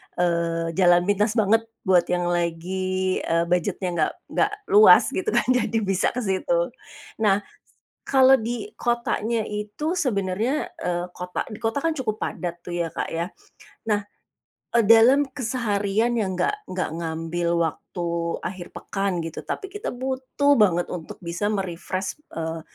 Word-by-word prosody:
eee, 170 -1 0
jalan 175 -1 +5
pintas 205 +3 +1
banget 225 +1 +3 0.2
buat 185 -3 +4
yang 175 0 0
lagi, 185 +2 -1
eee, 165 0 +1
budgetnya 180 +1 0
enggak 170 -3 +1 0.2
enggak 410 - +2 0.2
luas, 420 +1 +8
gitu - - -3
kan - - +4
jadi 245 -2 +1
bisa 195 -1 +1
ke 250 - -2
situ. - - 0 0.5
Nah, 205 -2 +3 0.6
kalau 265 0 +5
di 240 - -1
kotanya 235 -2 -1
itu, 210 - -3
sebenarnya, 250 - -1
eee, 175 0 -1
kota 180 0 -4
di 215 0 -10
kota 225 +4 -1
kan 325 +3 +1
cukup 245 -7 -2
padat 175 -4 -4
tuh 175 - -5
ya, 170 -1 -1
Kak, - - -4
ya. 170 +2 -2 0.6
Nah, 210 -2 +1 0.7
e 235 - +5
dalam 230 +6 +7
keseharian 225 -3 0
yang 190 -3 -1
enggak 415 - -1
enggak 185 -3 -3
ngambil 165 +1 -2
waktu 170 +2 -4 0.4
akhir 180 -2 -6
pekan, 195 -3 -2
gitu, 165 0 -6
tapi 390 - -4
kita 415 +4 -4
butuh 265 +2 +1
banget 175 -5 +3
untuk 170 -3 -7
bisa 170 +4 -2
me-refresh, 190 - -3 0.2
eee, 165 0 -3
195 Hz, 145 wpm, -24 LUFS, 175-235 Hz, 0.7 s, luas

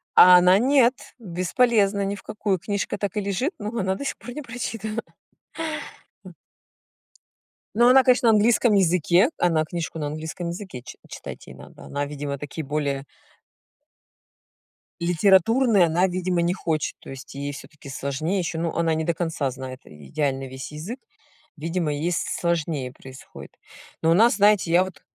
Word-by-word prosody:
А 180 0 +9
она 180 +1 +6
нет, 255 0 +4 0.3
бесполезно, 200 +2 +1
ни 200 +1 -2
в 200 - -13
какую, 210 -2 -1
книжка 200 +3 -3
так 200 -2 -3
и - - +1
лежит, 200 - -1
но 210 - -4
она 190 0 0
до 280 - -6
сих - - -3
пор 245 - -9
не 300 - -6
прочитана. 230 -3 -5 1.3
М. - - -11 1.4
Ну, 240 +2 +5
она, 260 +1 +7
конечно, 250 -2 +4
на - - +6
английском 220 +1 +3
языке, 180 - +3
она 165 -3 +2
книжку 165 0 -5
на 150 - -2
английском 160 +3 -5
языке 175 -7 -7
чи - - -11
читать - - -9
ей - - -10
надо. - - -14
Она, 145 0 -3
видимо, 145 -1 -5
такие 150 +2 -6
более 140 -1 -2 1.9
Литературные 195 +5 +4
она, 170 +3 +2
видимо, 180 -1 -1
не 170 +1 +1
хочет. 160 -5 -2
То - - -13
есть, 135 -1 -9
ей 140 +1 -4
всё-таки 145 0 -12
сложнее 140 +7 -2
ещё. 170 -2 -3
Ну, 165 0 -1
она 165 -1 +1
не 160 0 -1
до 170 - +1
конца 160 -5 -2
знает 130 0 -8
идеально 135 - -3
весь 130 +1 -8
язык. 180 - -6 0.6
Видимо, 165 0 -2
ей 155 +5 -1
с 170 - 0 0.2
сложнее 160 -6 -1
происходит. 130 +2 -12 0.5
Но 165 - +3
у - - +6
нас, 225 +6 +5
знаете, 205 -4 +3
я 175 +2 +5
вот 185 -5 -10
175 Hz, 165 wpm, -24 LUFS, 150-205 Hz, 1.9 s, А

